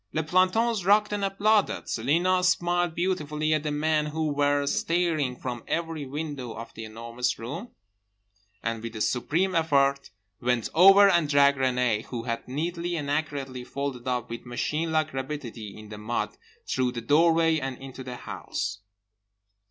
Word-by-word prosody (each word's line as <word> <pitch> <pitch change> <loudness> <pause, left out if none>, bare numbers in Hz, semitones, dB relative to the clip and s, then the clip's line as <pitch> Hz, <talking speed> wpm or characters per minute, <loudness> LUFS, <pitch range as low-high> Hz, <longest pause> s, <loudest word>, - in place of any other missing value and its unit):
Les 160 - 0
plantons 185 +6 +2
rocked 210 +2 +4
and 205 -1 -1
applauded. 200 +1 +2
Celina 175 +10 +1
smiled 175 -2 +1
beautifully 155 -4 0
at 155 - +1
the 150 - -2
men 150 +1 +1
who 155 0 -1
were 145 0 +2
staring 160 -4 0
from 120 -2 -5
every 165 -4 -2
window 140 -4 -5
of 115 0 -9
The 110 - -7
Enormous 115 +3 -3
Room 165 - -6 0.9
and, 115 -1 -2
with 115 0 -7
a 110 - -4
supreme 165 - +1
effort, 140 -4 +2 0.3
went 120 -2 0
over 195 +4 +8
and 170 -6 +3
dragged 140 -1 +4
Renée 125 -4 +1
(who 120 -2 -5
had 115 -1 -4
neatly 170 +6 -2
and 145 -3 -3
accurately 140 -4 -2
folded 135 -2 -5
up 125 -2 -2
with 115 - -6
machine 150 +6 -2
like 155 -2 +1
rapidity 130 -6 -5
in 110 -1 -11
the 105 -1 -8
mud) 110 +3 -2 0.3
through 125 - 0
the 120 - -4
doorway 165 +4 +4
and 135 -2 -4
into 135 -1 -9
the 125 -1 -6
house. 100 -4 -5
145 Hz, 160 wpm, -27 LUFS, 125-170 Hz, 0.9 s, over